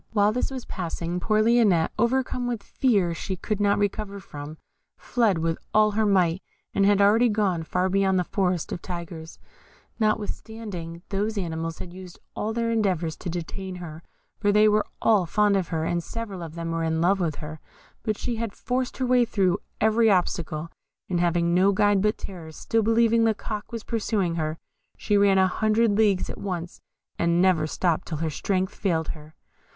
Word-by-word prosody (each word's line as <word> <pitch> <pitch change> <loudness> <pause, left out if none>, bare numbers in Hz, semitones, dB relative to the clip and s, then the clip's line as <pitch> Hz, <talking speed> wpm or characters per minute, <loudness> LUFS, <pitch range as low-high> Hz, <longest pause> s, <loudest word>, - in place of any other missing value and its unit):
While 205 -1 +4
this 250 - -1
was 260 -2 -6
passing, 175 -1 -4
poor 215 +3 +2
Lionette, 215 -8 +3
overcome 250 +1 +1
with 235 -4 -3
a - - -25
fear 200 -10 +1
she 190 +3 -4
could 210 +3 -3
not 205 0 +3
recover 205 0 -2
from, 150 -3 -9 0.4
fled 225 -7 +1
with 165 0 -1 0.2
all 215 0 +5
her 215 +1 +1
might, 185 -2 +2 0.3
and 195 0 +3
had 205 -1 +4
already 225 +4 +5
gone 200 -6 +1
far 180 +3 0
beyond 190 0 +2
the 180 - +2
Forest 180 -2 -1
of 170 - -4
Tigers, 170 -2 -7 0.6
notwithstanding 210 -5 -3
those 205 +2 -1
animals 165 -3 -3
had 175 - -8
used 185 -1 -10 0.2
all 215 - -2
their 230 0 -1
endeavours 185 -8 0
to - - -5
detain 180 +3 -5
her, 165 -3 -8 0.4
for 205 -1 +2
they 210 +1 +5
were 210 0 +2 0.2
all 205 -6 +4
fond 210 +3 +3
of 190 -3 0
her, 160 -2 -2
and 170 0 -1
several 210 -4 -6
of 165 -1 -7
them 165 0 -4
were 165 0 -1
even 160 0 0
in 160 - 0
love 195 +3 +3
with 165 -5 -1
her; 155 +1 -8 0.4
but 215 -2 -2
she 240 -2 -3
had 225 -2 -4
forced 255 0 -2
her 260 - 0
way 250 0 +4
through 195 -6 +1 0.2
every 220 +1 +4
obstacle, 170 -4 0 0.4
and 175 -2 0
having 170 0 +2
no 185 +3 +4
guide 205 0 +3
but 210 +1 +1
terror, 170 -5 -8
still 225 +8 0
believing 230 +1 +3
the 220 -1 +2
Cock 210 0 -6
was 230 -1 -5
pursuing 210 -6 -1
her, 155 -1 -2 0.4
she 210 - 0
ran 200 -1 +5
a 190 - +5
hundred 215 +4 +2
leagues 205 -3 +2
at - - -7
once, 175 -3 -5 0.4
and 170 0 +2
never 175 -4 +3
stopped 170 0 0
till 160 - -3
her 160 +1 -2
strength 190 +4 -1
failed 165 -5 -1
her. 155 0 -9
195 Hz, 190 wpm, -25 LUFS, 170-215 Hz, 0.6 s, all